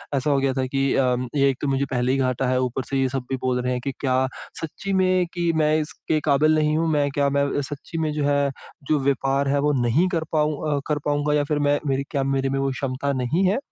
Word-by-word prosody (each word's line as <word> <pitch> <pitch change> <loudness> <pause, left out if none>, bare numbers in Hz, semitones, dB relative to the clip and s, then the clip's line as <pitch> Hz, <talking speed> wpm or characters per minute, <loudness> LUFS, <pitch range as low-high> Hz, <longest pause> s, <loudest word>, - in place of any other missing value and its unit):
ऐसा 135 +2 0
हो 140 - +3
गया 135 -1 +1
था 130 0 -1
कि 135 +1 0
अ, 125 -2 +2 0.2
ये 140 -1 +4
एक 135 - -2
तो 145 - -1
मुझे 135 0 +1
पहले 125 0 +1
ही 135 - +1
घाटा 130 -1 0
है, 130 0 +2
ऊपर 130 +1 -1
से 135 - 0
ये 130 - +1
सब 135 -1 -3
भी 135 - 0
बोल 125 -1 0
रहे 125 +1 -1
हैं 125 -1 -2
कि 140 - -2
क्या 130 -1 +1 0.3
सच्ची 180 +5 -4
में 185 -1 +3
कि 175 -2 +1
मैं 155 -1 +3
इसके 155 0 -2
काबिल 155 +2 +4
नहीं 155 0 +2
हूँ? 165 +1 +1
मैं 145 -2 +2
क्या 140 0 +1
मैं 140 0 +1 0.2
सच्ची 145 +4 -7
में 160 -1 0
जो 150 -1 -1
है, 140 -1 +2 0.4
जो 155 -1 +2
व्यापार 135 0 +1
है, 140 +1 +2
वो 150 +1 +2
नहीं 125 +10 +2
कर 165 -3 -1
पाऊँ 150 -1 0
अ, - - 0
कर 150 -1 0
पाऊँगा 145 0 +1
या 150 -1 +2
फिर 150 +1 -1
मैं 145 0 +3
मेरी 135 0 0
क्या 140 -3 0
मेरे 135 0 0
में 135 0 -1
वो 135 0 0
क्षमता 135 +1 -2
नहीं 130 +9 0
है? 195 - +2
140 Hz, 265 wpm, -23 LUFS, 135-150 Hz, 0.4 s, ये